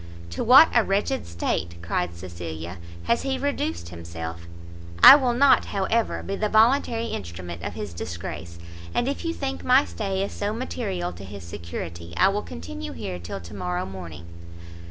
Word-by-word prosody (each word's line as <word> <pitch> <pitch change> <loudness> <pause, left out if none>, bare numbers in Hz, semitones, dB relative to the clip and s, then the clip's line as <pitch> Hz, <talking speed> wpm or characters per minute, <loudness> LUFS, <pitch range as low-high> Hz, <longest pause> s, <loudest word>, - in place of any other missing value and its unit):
"To 85 - -2
what 270 +7 +9
a 235 - +5
wretched 205 +7 0
state," 85 0 -2
cried 85 0 -1
Cecilia, 85 -1 -7 0.2
"has 235 - +1
he 270 -1 -1
reduced 85 - -2
himself! 85 0 -7 0.6
I - - +13
will 255 -4 +2
not, 275 +2 +5
however, 215 +4 0
be 195 - -3
the 210 +1 -1
voluntary 230 +1 +3
instrument 85 -1 -6
of - - -5
his 105 -4 -5
disgrace; 85 0 -6 0.4
and 240 - +1
if 280 - -2
you 335 - -1
think 275 -4 -4
my 260 +3 +5
stay 195 -2 -2
is 200 - -3
so 205 +1 -2
material 200 -7 -3
to - - -10
his 100 -1 -9
security, 85 0 -7
I 190 - +6
will 205 +1 -1
continue 100 - -7
here 90 +2 -5
till 85 +3 -6
to 85 +3 -11
morrow 90 -2 -2
morning." 85 -4 -8
95 Hz, 170 wpm, -25 LUFS, -, 0.6 s, I